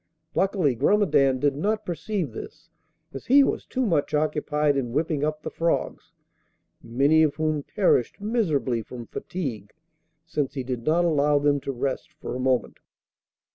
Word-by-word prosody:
Luckily 190 Hz, -8 st, +1 dB
Grumedan 140 Hz, -, +3 dB
did 140 Hz, +1 st, +1 dB
not 215 Hz, +8 st, -1 dB
perceive 180 Hz, -, -3 dB
this, 110 Hz, -, -10 dB, 0.4 s
as 135 Hz, -, -8 dB
he 280 Hz, +3 st, +7 dB
was -, -, -2 dB
too 260 Hz, -1 st, -1 dB
much 155 Hz, -6 st, +1 dB
occupied 150 Hz, -1 st, +1 dB
in 120 Hz, -4 st, -2 dB
whipping 150 Hz, 0 st, 0 dB
up 155 Hz, 0 st, -2 dB
the -, -, -5 dB
frogs, 165 Hz, 0 st, -2 dB, 0.7 s
many 140 Hz, +7 st, +3 dB
of 155 Hz, -2 st, +2 dB
whom 155 Hz, -2 st, 0 dB
perished 180 Hz, -, +1 dB
miserably 165 Hz, -, 0 dB
from 120 Hz, +2 st, -9 dB
fatigue, 120 Hz, -, -5 dB, 0.5 s
since 150 Hz, -4 st, -2 dB
he 135 Hz, -, -2 dB
did 125 Hz, -2 st, -5 dB
not 170 Hz, +3 st, +3 dB
allow 150 Hz, -3 st, +3 dB
them 145 Hz, 0 st, +2 dB
to 135 Hz, -, -4 dB
rest 130 Hz, +1 st, -3 dB
for -, -, -7 dB
a -, -, -4 dB
moment. 130 Hz, -2 st, 0 dB
150 Hz, 155 wpm, -25 LUFS, 135-170 Hz, 0.7 s, he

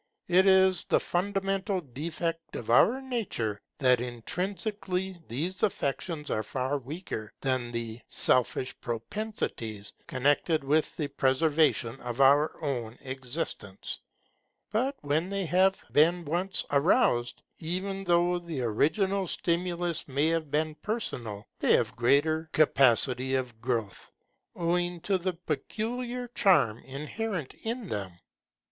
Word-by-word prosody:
It 185 Hz, +2 st, +5 dB
is 190 Hz, -1 st, +5 dB
the -, -, +3 dB
fundamental 195 Hz, +1 st, -1 dB
defect 165 Hz, +3 st, -4 dB
of 115 Hz, -, -3 dB
our 240 Hz, -, +5 dB
nature, 195 Hz, -, -2 dB, 0.2 s
that 125 Hz, -4 st, +4 dB
intrinsically 185 Hz, -, -3 dB
these 165 Hz, +11 st, -3 dB
affections 150 Hz, -4 st, -1 dB
are 110 Hz, -, +1 dB
far 130 Hz, +6 st, -2 dB
weaker 135 Hz, -, -6 dB
than 130 Hz, -3 st, 0 dB
the 115 Hz, -1 st, -4 dB
selfish 130 Hz, +1 st, +1 dB
propensities 115 Hz, -, -4 dB
connected 145 Hz, +4 st, +2 dB
with 150 Hz, +3 st, +1 dB
the 150 Hz, -, -1 dB
preservation 135 Hz, -3 st, +2 dB
of 120 Hz, +1 st, -5 dB
our 140 Hz, +3 st, +5 dB
own 120 Hz, -5 st, -2 dB
existence. 130 Hz, -, -5 dB, 0.7 s
But 255 Hz, +6 st, +1 dB
when 150 Hz, +5 st, 0 dB
they 200 Hz, -1 st, -1 dB
have 190 Hz, +3 st, +3 dB
been 170 Hz, +3 st, +4 dB
once 175 Hz, +6 st, 0 dB
aroused, 140 Hz, -, +2 dB, 0.2 s
even 190 Hz, +4 st, -3 dB
though 175 Hz, 0 st, +3 dB
the 165 Hz, -6 st, -5 dB
original 190 Hz, -, +1 dB
stimulus 170 Hz, 0 st, -1 dB
may 140 Hz, +3 st, +1 dB
have 165 Hz, -2 st, -1 dB
been 155 Hz, +2 st, 0 dB
personal, 120 Hz, -, -3 dB
they -, -, +4 dB
have -, -, +2 dB
greater 155 Hz, +7 st, +2 dB
capacity 130 Hz, -3 st, +4 dB
of 125 Hz, -4 st, -3 dB
growth, 115 Hz, -5 st, -3 dB, 0.4 s
owing 175 Hz, +1 st, 0 dB
to 195 Hz, +1 st, +1 dB
the 185 Hz, +1 st, -1 dB
peculiar 235 Hz, -, -3 dB
charm 140 Hz, -, +3 dB
inherent 150 Hz, -, -4 dB
in 230 Hz, -1 st, -3 dB
them. 95 Hz, -3 st, -3 dB
155 Hz, 120 wpm, -29 LUFS, 130-185 Hz, 0.7 s, It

